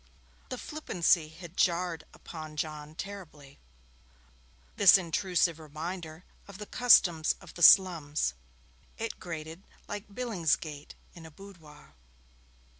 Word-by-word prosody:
The - - -5
flippancy 175 - 0
had 170 +2 -12
jarred 170 -3 0
upon 155 -2 -10
John 150 0 -5
terribly: 160 -8 -10 1.2
this 200 -1 +7
intrusive 175 -2 0
reminder 160 +2 -7 0.2
of 200 -1 -11
the 210 - -8
customs 175 -10 +4
of 190 - -14
the 175 - -10
slums. 160 - +5 0.6
It 225 0 -5
grated 165 0 -7 0.3
like 205 +1 -6
Billingsgate 165 -10 -2 0.2
in 170 - -13
a 160 - -11
boudoir. 160 -4 -15
170 Hz, 110 wpm, -29 LUFS, 155-190 Hz, 1.2 s, this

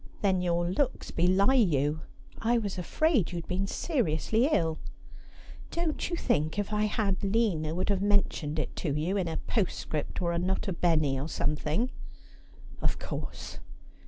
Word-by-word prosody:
' - - -24
Then 190 -2 +3
your 175 -1 +1
looks 255 +9 -1
belie 185 +7 +4
you. 155 - +2 0.4
I 235 +2 +3
was 200 -5 -2
afraid 265 - +2
you - - -5
had 170 - -5
been 190 +2 -1
seriously 225 - +1
ill.' 160 - +1 0.5
' - - -18
Don't 335 -2 -1
you 345 - -1
think 155 - 0
if 205 +1 -1
I 210 0 +2
had 205 -3 0
Lina 195 -7 +1
would 185 - -1
have 195 -2 +1
mentioned 200 -7 +1
it 155 - -2
to 145 -5 -1
you 175 +6 0
in 190 -4 0
a 165 - -2
postscript, 180 -7 -2
or 170 -1 0
a 170 - 0
nota 190 +2 -1
bene, 155 -6 +2
or 150 - -4
something?' 155 - 0 0.4
' - - -19
Of - - +1
course.' - - -6
185 Hz, 170 wpm, -29 LUFS, 160-215 Hz, 0.5 s, belie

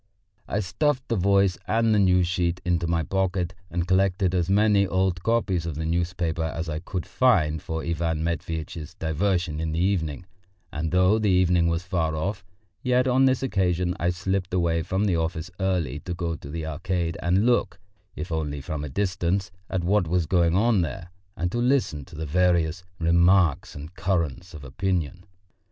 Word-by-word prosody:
I 105 - -1
stuffed 135 - -1
the 115 - +1
Voice 100 -1 +2
and 115 +1 +2
the 105 - +3
News 90 -2 +4
sheet 90 0 0
into 85 -1 +1
my 85 -1 +1
pocket 95 0 -1 0.2
and 85 0 -2
collected 95 0 +2
as 90 -1 0
many 100 0 +4
old 95 -1 0
copies 95 -6 0
of 80 - -4
the 80 +2 -3
newspapers 85 -1 -1
as 80 0 -3
I 75 -1 -3
could 90 +1 -5
find 80 - +2
for 80 0 -4
Ivan 80 -1 -1
Matveitch's 80 0 -4
diversion 85 -1 -1
in 80 -1 -2
the 80 - -1
evening, 90 -3 0 0.5
and 80 +1 -2
though 90 +4 +4
the 105 -2 +1
evening 90 -2 +3
was 85 +1 0
far 85 -4 -1
off, 95 +4 -3 0.4
yet 125 -1 +2
on 130 +1 +4
this 130 0 +2
occasion 90 -6 0
I 85 - +1
slipped 95 +1 -2
away 85 -2 +1
from 95 +5 -1
the 90 -5 +1
office 80 +2 -3
early 90 -8 -1
to 90 +4 -5
go 85 -1 -2
to 70 - -10
the 80 +1 -4
Arcade 85 +1 -2
and 90 +5 +2
look, 120 0 +2 0.4
if 90 - -6
only 75 -3 -2
from 75 +2 -5
a 75 - -5
distance, 90 +2 -1 0.2
at 90 -2 -1
what 95 0 +2
was 90 0 +1
going 85 0 +2
on 110 0 +3
there, 85 +2 -5 0.3
and 85 +1 -1
to 120 - -2
listen 120 - +1
to 85 - -13
the 80 +1 -4
various 85 +2 +1
remarks 85 0 +3
and 75 +4 -9
currents 90 -2 -2
of 75 - -9
opinion. 90 +3 -2
90 Hz, 180 wpm, -25 LUFS, 80-95 Hz, 0.5 s, News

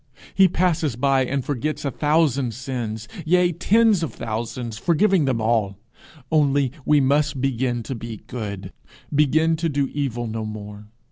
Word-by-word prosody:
He 190 -1 +6
passes 165 -7 0
by 135 +1 +2
and 135 0 -2
forgets 145 +2 -3
a 140 - 0
thousand 145 -6 +1
sins, 115 -4 -5 0.2
yea, 175 +2 +3
tens 210 +3 +3
of 165 - -2
thousands, 115 0 -4
forgiving 180 - +3
them 130 -4 0
all 110 -3 0 0.5
only 140 -4 +2
we 150 -1 +4
must 140 +1 +1
begin 125 -2 -1
to 135 - -5
be 115 -2 -7
good, 100 -6 -6 0.4
begin 155 +3 +3
to 165 +1 -1
do 140 -2 -1
evil 130 -5 -2
no 110 0 -4
more. 105 -1 -8
135 Hz, 150 wpm, -22 LUFS, 115-155 Hz, 0.5 s, He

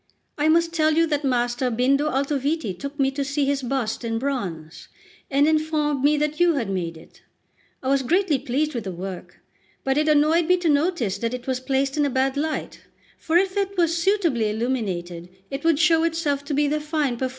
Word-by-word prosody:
I 300 +1 +1
must 335 +1 +3
tell 310 -1 +2
you 330 +1 +4
that 295 -2 -1
Master 245 -1 0
Bindo 270 +5 +2
Altoviti 280 - -1
took 280 +9 -7
me 270 0 +2
to 280 +1 -2
see 280 +1 -1
his 280 0 0
bust 245 -3 -2
in 225 -1 -2
bronze, 190 - -4 0.4
and 280 +2 +3
informed 305 -3 0
me 295 +1 +4
that 300 +1 -1
you 350 -2 +4
had 230 -8 -2
made 170 -3 -3
it. 160 - -17 0.6
I 260 - -1
was 275 0 +3
greatly 325 +1 +1
pleased 295 +6 -1
with 235 -4 -4
the 190 - -3
work; 185 +1 -8 0.4
but 270 +2 +1
it 305 - +1
annoyed 310 +2 +3
me 365 0 +4
to 350 -2 0
notice 285 - +1
that 230 +2 -2
it 250 0 -9
was 260 -1 -1
placed 270 +2 -1
in 295 - +3
a - - -1
bad 265 +1 0
light; 310 +2 -3 0.4
for 325 +2 +2
if 375 +1 +1
it 400 -1 -1
were 345 - +5
suitably 335 - +1
illuminated, 190 -7 -3 0.2
it 275 +1 -4
would 325 -2 +3
show 325 +1 +4
itself 320 -4 -1
to 285 - -2
be 295 +1 +2
the 305 +1 0
fine 300 -3 -1
performance - - -11
that 260 - 0
it - - 0
is." - - -7
280 Hz, 215 wpm, -23 LUFS, 250-310 Hz, 0.6 s, were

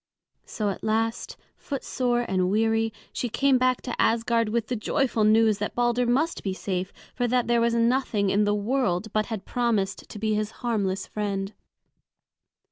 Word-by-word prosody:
So 210 -2 -2
at - - -8
last, 225 +1 -1 0.2
footsore 250 -3 -2
and 185 -1 +1
weary, 225 +2 +1 0.2
she 245 - -2
came 270 +2 +3
back 255 0 +1
to 245 - -2
Asgard 230 0 +2
with 230 0 0
the 245 - -3
joyful 230 +1 0
news 215 0 +4
that 210 - -3
Balder 240 0 +1
must 290 +8 +1
be 190 -2 -3
safe, 185 -1 -3 0.2
for 245 -1 0
that 245 0 +1
there 235 -1 +2
was 235 0 +2
nothing 230 -4 +1
in 205 +1 +3
the 205 0 +2
world 215 -3 -1
but 215 0 +1
had 220 -4 -5
promised 220 -6 -1
to - - -8
be 215 +1 0
his 210 0 -1 0.2
harmless 195 -5 0
friend. 200 -1 -3
225 Hz, 170 wpm, -26 LUFS, 205-240 Hz, 0.2 s, news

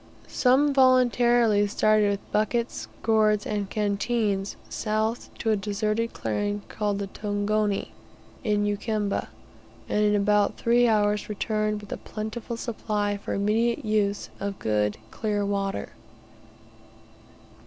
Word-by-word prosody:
Some 275 +3 +3
voluntarily 240 -5 +4
started 215 0 +3
with 200 0 -4
buckets, 230 +3 -1 0.2
gourds, 215 -2 +3
and 205 -2 -2
canteens 205 -1 -1
south 220 +2 -2
to 225 - 0
a - - +4
deserted 215 +3 -1
clearing 205 0 -2
called 205 -2 -1
the 200 - -2
"Tongoni" 205 +1 -1 0.5
in 210 -1 +1
Ukamba, 205 0 -1 0.6
and 210 - +1
in 210 0 +3
about 205 0 +2
three 240 +1 +3
hours 210 -2 +1
returned 215 0 -1
with 205 - -12
a - - -3
plentiful 220 +2 -6
supply 210 -3 -2
for 200 - -4
immediate 230 +5 +1
use, 210 -2 0
of 200 -1 -3
good 105 -1 0
and 110 0 -24
clear 205 -2 -1
water. 200 -1 -2
210 Hz, 120 wpm, -26 LUFS, 205-225 Hz, 0.6 s, voluntarily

